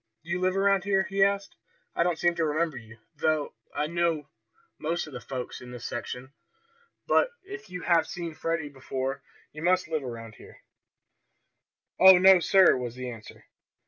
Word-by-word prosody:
Do 170 Hz, -, -8 dB
you 180 Hz, -, 0 dB
live 185 Hz, +1 st, +1 dB
around 195 Hz, -1 st, +3 dB
here?" 195 Hz, -1 st, +2 dB
he 195 Hz, +1 st, +1 dB
asked. 200 Hz, 0 st, 0 dB, 0.4 s
"I -, -, +1 dB
don't 170 Hz, -1 st, +1 dB
seem 175 Hz, +1 st, +2 dB
to 170 Hz, -, -1 dB
remember 155 Hz, 0 st, 0 dB
you, 115 Hz, -2 st, -11 dB, 0.2 s
though 155 Hz, 0 st, 0 dB, 0.2 s
I 145 Hz, +1 st, -1 dB
know 165 Hz, -2 st, -1 dB, 0.5 s
most 165 Hz, +3 st, -2 dB
of 150 Hz, -, -12 dB
the 125 Hz, -, -7 dB
folks 130 Hz, -2 st, -6 dB
in 125 Hz, -, -10 dB
this 125 Hz, -1 st, -8 dB
section. 125 Hz, +2 st, -6 dB, 0.7 s
But -, -, +3 dB
if 395 Hz, +1 st, -9 dB
you 180 Hz, -2 st, -7 dB
have 170 Hz, -2 st, +3 dB
seen 170 Hz, -2 st, -5 dB
Freddie 160 Hz, 0 st, -2 dB
before 135 Hz, -1 st, -4 dB, 0.3 s
you 155 Hz, -, -8 dB
must 180 Hz, +1 st, +2 dB
live 155 Hz, -3 st, -2 dB
around 115 Hz, -3 st, -7 dB
here." -, -, -16 dB, 1.4 s
"Oh, 190 Hz, 0 st, +9 dB
no, 190 Hz, 0 st, +7 dB
sir," 190 Hz, +1 st, +5 dB
was 125 Hz, -2 st, -4 dB
the 125 Hz, -1 st, -5 dB
answer. 110 Hz, -2 st, -12 dB
160 Hz, 175 wpm, -27 LUFS, 130-185 Hz, 1.4 s, Oh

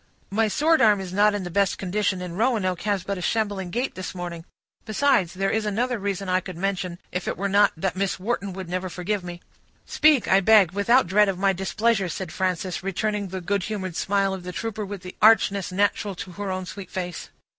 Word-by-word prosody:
"My 220 Hz, +2 st, +2 dB
sword 310 Hz, +9 st, +3 dB
arm 210 Hz, -3 st, +5 dB
is 185 Hz, -1 st, -6 dB
not 205 Hz, +1 st, +4 dB
in 205 Hz, -, -3 dB
the 175 Hz, -, -6 dB
best 200 Hz, +1 st, +1 dB
condition, 190 Hz, -1 st, -1 dB
and 175 Hz, -1 st, -6 dB
Roanoke 205 Hz, -5 st, 0 dB
has 205 Hz, -3 st, -1 dB
but 195 Hz, 0 st, -3 dB
a -, -, -6 dB
shambling 205 Hz, -2 st, -1 dB
gait 245 Hz, +8 st, -2 dB
this 185 Hz, 0 st, -6 dB
morning; 175 Hz, -2 st, -6 dB, 0.4 s
besides, 215 Hz, -6 st, +1 dB
there 195 Hz, +1 st, 0 dB
is 220 Hz, -, 0 dB
another 230 Hz, +3 st, -1 dB
reason 195 Hz, -1 st, -3 dB
I 185 Hz, 0 st, +2 dB
could 185 Hz, -2 st, -8 dB
mention, 185 Hz, -2 st, -2 dB
if 180 Hz, -, -3 dB
it -, -, -2 dB
were 200 Hz, -, -1 dB
not 200 Hz, +1 st, +4 dB
that 190 Hz, +3 st, -1 dB
Miss 195 Hz, -1 st, -1 dB
Wharton 200 Hz, -1 st, -2 dB
would 190 Hz, -1 st, -7 dB
never 185 Hz, +1 st, -3 dB
forgive 190 Hz, +3 st, -3 dB
me." 175 Hz, 0 st, -8 dB, 0.4 s
"Speak, 305 Hz, -6 st, +3 dB
I 190 Hz, -, +5 dB
beg, 200 Hz, -3 st, +5 dB
without 220 Hz, +7 st, +3 dB
dread 200 Hz, +3 st, +4 dB
of 190 Hz, -, -2 dB
my 195 Hz, +1 st, +2 dB
displeasure," 195 Hz, +1 st, 0 dB
said 180 Hz, 0 st, -5 dB
Frances, 185 Hz, +1 st, -2 dB
returning 205 Hz, +2 st, -2 dB
the 190 Hz, 0 st, -5 dB
good 200 Hz, +3 st, 0 dB
humored 190 Hz, -5 st, -4 dB
smile 195 Hz, 0 st, +1 dB
of 190 Hz, -, -5 dB
the 180 Hz, +1 st, -6 dB
trooper, 215 Hz, +1 st, -4 dB
with 200 Hz, -2 st, -7 dB
the 180 Hz, -, -9 dB
archness 200 Hz, -3 st, +4 dB
natural 200 Hz, +1 st, 0 dB
to 180 Hz, -, -7 dB
her 200 Hz, +2 st, -5 dB
own 185 Hz, 0 st, -3 dB
sweet 195 Hz, +1 st, -8 dB
face. 180 Hz, -2 st, -5 dB
195 Hz, 220 wpm, -24 LUFS, 185-210 Hz, 0.4 s, arm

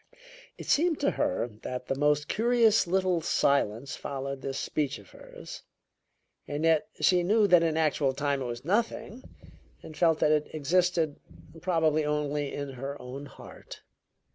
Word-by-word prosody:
It -, -, -9 dB
seemed 325 Hz, +1 st, +2 dB
to 285 Hz, -, +2 dB
her 290 Hz, -, -1 dB
that 125 Hz, 0 st, -5 dB
the -, -, -1 dB
most 150 Hz, +1 st, +1 dB
curious 225 Hz, -3 st, +3 dB
little 185 Hz, -1 st, +1 dB
silence 140 Hz, -4 st, +1 dB
followed 135 Hz, 0 st, -5 dB
this 135 Hz, +1 st, -4 dB
speech 145 Hz, -2 st, -2 dB
of 100 Hz, -, -17 dB
hers, -, -, -11 dB, 0.9 s
and 145 Hz, +2 st, -3 dB
yet 165 Hz, +3 st, +3 dB
she 180 Hz, -1 st, +4 dB
knew 210 Hz, +5 st, +3 dB
that 175 Hz, -3 st, +6 dB
in 160 Hz, -1 st, 0 dB
actual 150 Hz, -3 st, +1 dB
time 140 Hz, 0 st, -1 dB
it -, -, -3 dB
was 120 Hz, +2 st, -6 dB
nothing, 230 Hz, +4 st, -1 dB, 0.6 s
and 155 Hz, -, -10 dB
felt 165 Hz, -2 st, +3 dB
that 150 Hz, -, +2 dB
it 150 Hz, 0 st, 0 dB
existed 165 Hz, 0 st, +1 dB, 0.4 s
probably 160 Hz, -4 st, +1 dB
only 150 Hz, -1 st, -1 dB
in 140 Hz, -1 st, -5 dB
her 135 Hz, +2 st, -6 dB
own 135 Hz, +3 st, -8 dB
heart. -, -, -12 dB
150 Hz, 155 wpm, -28 LUFS, 140-180 Hz, 0.9 s, that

